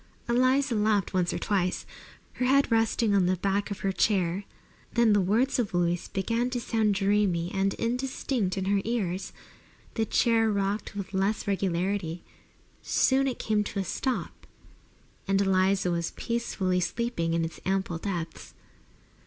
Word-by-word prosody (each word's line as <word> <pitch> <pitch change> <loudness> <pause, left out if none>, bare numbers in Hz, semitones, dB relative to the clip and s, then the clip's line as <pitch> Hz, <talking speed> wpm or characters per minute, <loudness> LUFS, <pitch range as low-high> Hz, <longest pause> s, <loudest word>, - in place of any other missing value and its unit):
Eliza 255 +2 +2
laughed 210 -3 +1
once 180 -2 +1
or - - -2
twice, 185 -3 -1 0.5
her 250 - -1
head 275 0 +3
resting 225 -1 +2
upon 190 -3 +3
the 185 - +2
back 200 +3 -1
of 200 - -5
her 195 - 0
chair. 190 -1 +1 0.5
Then 235 -2 +5
the 205 - +4
words 230 +9 +1
of 205 -6 -1
Louise 175 0 0
began 230 +5 -1
to 250 -1 -2
sound 220 -3 +1
dreamy 195 -3 +1
and 195 0 +1
indistinct 245 -4 -1
in 190 - -1
her 200 0 +2
ears. 200 -5 -2 0.6
The 225 - 0
chair 225 -1 +3
rocked 200 +1 -2
with 200 -1 -6
less 195 +3 0
regularity; 185 -2 -1 0.6
soon 270 +1 +2
it 255 - -2
came 215 -1 0
to 200 - -4
a - - 0
stop, 255 +7 -3 0.8
and 195 0 +2
Eliza 190 -1 +2
was 170 -1 -2
peacefully 195 -6 -1
sleeping 175 -2 -1
in 165 -1 +1
its 165 - -7
ample 190 -3 -1
depths. 170 -4 -5
200 Hz, 155 wpm, -27 LUFS, 185-230 Hz, 0.8 s, Then